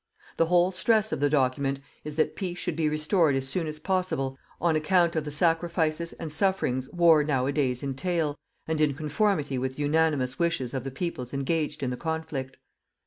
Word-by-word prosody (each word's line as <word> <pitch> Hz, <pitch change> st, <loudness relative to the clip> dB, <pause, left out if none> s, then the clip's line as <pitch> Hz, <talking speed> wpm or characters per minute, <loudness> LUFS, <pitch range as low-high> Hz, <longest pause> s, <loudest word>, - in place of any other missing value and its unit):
The 165 Hz, -, +3 dB
whole 175 Hz, +1 st, +4 dB
stress 215 Hz, +4 st, +2 dB
of -, -, -1 dB
the 145 Hz, 0 st, +2 dB
document 135 Hz, -1 st, +1 dB, 0.2 s
is 150 Hz, -1 st, -6 dB
that 155 Hz, -, +1 dB
peace 180 Hz, -3 st, -4 dB
should 175 Hz, -3 st, -2 dB
be 155 Hz, -1 st, +1 dB
restored 155 Hz, 0 st, +2 dB
as 135 Hz, 0 st, -1 dB
soon 165 Hz, +4 st, -2 dB
as 155 Hz, 0 st, -5 dB
possible 165 Hz, -7 st, -1 dB, 0.2 s
on 170 Hz, -2 st, +2 dB
account 170 Hz, +2 st, +2 dB
of 155 Hz, -2 st, -1 dB
the -, -, -3 dB
sacrifices 165 Hz, +1 st, 0 dB
and 160 Hz, -3 st, -6 dB
sufferings 155 Hz, -9 st, 0 dB
war 170 Hz, -3 st, +5 dB
nowadays 135 Hz, -2 st, 0 dB
entail, 145 Hz, +3 st, -1 dB, 0.3 s
and 160 Hz, -1 st, 0 dB
in 145 Hz, -3 st, +2 dB
conformity 150 Hz, -2 st, 0 dB
with 130 Hz, +1 st, -2 dB
the 145 Hz, -, -3 dB
unanimous 145 Hz, -4 st, +1 dB
wishes 165 Hz, -8 st, 0 dB
of 130 Hz, -2 st, -2 dB
the 135 Hz, -, -4 dB
peoples 135 Hz, -3 st, -4 dB
engaged 150 Hz, +2 st, -1 dB
in 125 Hz, -, 0 dB
the 125 Hz, -, -4 dB
conflict. 160 Hz, -5 st, -4 dB
155 Hz, 185 wpm, -27 LUFS, 135-170 Hz, 0.3 s, war